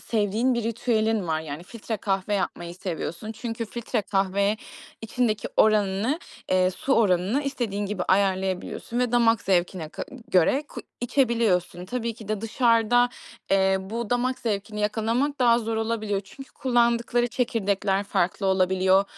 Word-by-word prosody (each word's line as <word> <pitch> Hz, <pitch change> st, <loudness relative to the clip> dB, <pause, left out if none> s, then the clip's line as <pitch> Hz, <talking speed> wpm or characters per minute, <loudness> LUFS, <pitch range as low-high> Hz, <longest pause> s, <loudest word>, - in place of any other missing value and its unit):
sevdiğin 220 Hz, +3 st, +1 dB
bir 235 Hz, -, -1 dB
ritüelin 225 Hz, -3 st, 0 dB
var. 155 Hz, 0 st, 0 dB
Yani 155 Hz, +1 st, -7 dB
filtre 225 Hz, +2 st, -5 dB
kahve 195 Hz, +1 st, -1 dB
yapmayı 175 Hz, -3 st, -3 dB
seviyorsun. 185 Hz, +2 st, -5 dB
Çünkü 225 Hz, +1 st, -4 dB
filtre 220 Hz, -1 st, -3 dB
kahve 200 Hz, +1 st, +1 dB, 0.5 s
içindeki 225 Hz, -2 st, -1 dB
oranını, 215 Hz, -, +3 dB, 0.3 s
eee, 185 Hz, 0 st, +3 dB
su 190 Hz, +9 st, -2 dB
oranını 200 Hz, +5 st, +2 dB
istediğin 235 Hz, -8 st, -2 dB
gibi 205 Hz, -1 st, -3 dB
ayarlayabiliyorsun 190 Hz, +3 st, 0 dB
ve 245 Hz, -1 st, +1 dB
damak 230 Hz, -2 st, +4 dB
zevkine 180 Hz, -3 st, 0 dB
ka -, -, -6 dB, 0.3 s
göre 190 Hz, -, +4 dB
ku -, -, -7 dB, 0.2 s
içebiliyorsun. 230 Hz, -9 st, +1 dB
Tabii 235 Hz, +2 st, -3 dB
ki 215 Hz, -2 st, -12 dB
de 215 Hz, -1 st, -1 dB
dışarıda, 230 Hz, +1 st, +3 dB, 0.4 s
eee, 190 Hz, 0 st, +4 dB
bu 220 Hz, +3 st, -5 dB
damak 250 Hz, +1 st, 0 dB
zevkini 210 Hz, -1 st, -3 dB
yakalamak 230 Hz, +7 st, 0 dB
daha 235 Hz, -2 st, +5 dB
zor 225 Hz, -1 st, -2 dB
olabiliyor. 220 Hz, -3 st, -1 dB
Çünkü 270 Hz, +7 st, -12 dB
kullandıkları 240 Hz, -1 st, +2 dB
çekirdekler 200 Hz, -5 st, 0 dB
farklı 195 Hz, 0 st, 0 dB
olabiliyor. 190 Hz, +1 st, +3 dB
215 Hz, 140 wpm, -25 LUFS, 190-235 Hz, 0.5 s, daha